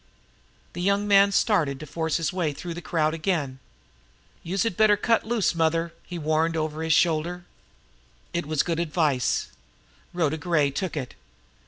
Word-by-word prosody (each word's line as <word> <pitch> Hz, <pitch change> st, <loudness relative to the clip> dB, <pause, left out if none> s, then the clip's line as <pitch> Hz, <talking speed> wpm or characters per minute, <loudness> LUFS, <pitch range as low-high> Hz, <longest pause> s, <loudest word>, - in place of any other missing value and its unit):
The 175 Hz, -, -5 dB
young 200 Hz, +2 st, +1 dB
man 200 Hz, 0 st, +6 dB
started 165 Hz, -, +1 dB
to 155 Hz, -, -7 dB
force 160 Hz, +1 st, -1 dB
his 165 Hz, +2 st, -2 dB
way 170 Hz, -5 st, -1 dB
through 170 Hz, +4 st, -6 dB
the 175 Hz, -, -7 dB
crowd 155 Hz, -2 st, 0 dB
again. 155 Hz, -6 st, -2 dB, 0.8 s
"Youse 185 Hz, +3 st, -1 dB
had 230 Hz, -6 st, -1 dB
better 210 Hz, 0 st, +4 dB
cut 225 Hz, +1 st, +1 dB
loose, 225 Hz, -5 st, +1 dB
mother!" 165 Hz, 0 st, 0 dB
he 175 Hz, -, -7 dB
warned 160 Hz, +1 st, 0 dB
over 155 Hz, 0 st, -2 dB
his 160 Hz, -1 st, +2 dB
shoulder. 175 Hz, +2 st, +1 dB, 0.9 s
It 170 Hz, -3 st, -2 dB
was 155 Hz, -2 st, +1 dB
good 170 Hz, -1 st, -2 dB
advice. 150 Hz, -6 st, 0 dB, 0.6 s
Rhoda 160 Hz, -3 st, 0 dB
Gray 150 Hz, -3 st, +1 dB
took 170 Hz, +3 st, -3 dB
it. 130 Hz, -4 st, -4 dB
165 Hz, 160 wpm, -25 LUFS, 155-180 Hz, 0.9 s, man